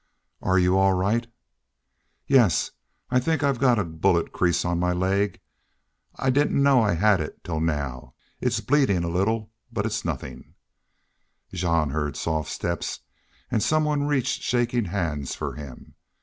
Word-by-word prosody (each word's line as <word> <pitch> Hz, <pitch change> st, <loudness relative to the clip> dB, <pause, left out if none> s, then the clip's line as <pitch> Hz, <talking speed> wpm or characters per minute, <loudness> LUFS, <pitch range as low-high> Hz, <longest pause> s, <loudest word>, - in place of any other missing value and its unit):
"Are 95 Hz, 0 st, +2 dB
you 90 Hz, +1 st, +3 dB
all 95 Hz, 0 st, +4 dB
right?" 105 Hz, +6 st, 0 dB, 1.0 s
"Yes. 120 Hz, -, +3 dB, 0.4 s
I 125 Hz, -, +4 dB
think 160 Hz, +4 st, 0 dB
I've 140 Hz, -4 st, +1 dB
got 125 Hz, -3 st, +4 dB
a 105 Hz, -, +1 dB
bullet 85 Hz, +1 st, 0 dB
crease 90 Hz, -1 st, +1 dB
on 85 Hz, -1 st, 0 dB
my 90 Hz, 0 st, +1 dB
leg. 95 Hz, +3 st, 0 dB, 0.8 s
I 130 Hz, -, +1 dB
didn't 140 Hz, +1 st, +2 dB
know 140 Hz, -3 st, +5 dB
I 105 Hz, -4 st, +2 dB
had 100 Hz, +3 st, +3 dB
it 75 Hz, -, -7 dB
till 80 Hz, -2 st, -3 dB
now.... 70 Hz, -5 st, -3 dB, 0.2 s
It's -, -, 0 dB
bleedin' 130 Hz, -11 st, +2 dB
a 85 Hz, -, -2 dB
little. 110 Hz, +5 st, 0 dB, 0.2 s
But 110 Hz, -3 st, -2 dB
it's 110 Hz, 0 st, -2 dB
nothin'." 80 Hz, -6 st, -6 dB, 1.0 s
Jean 85 Hz, -5 st, +1 dB
heard 75 Hz, -2 st, -2 dB
soft 80 Hz, -2 st, -2 dB
steps 85 Hz, -1 st, -3 dB, 0.5 s
and 110 Hz, -, +1 dB
some 155 Hz, +5 st, +2 dB
one 145 Hz, -1 st, 0 dB
reached 135 Hz, -4 st, 0 dB
shaking 120 Hz, -2 st, 0 dB
hands 85 Hz, -7 st, -3 dB
for -, -, -4 dB
him. 70 Hz, -4 st, -10 dB
95 Hz, 155 wpm, -25 LUFS, 85-120 Hz, 1.0 s, know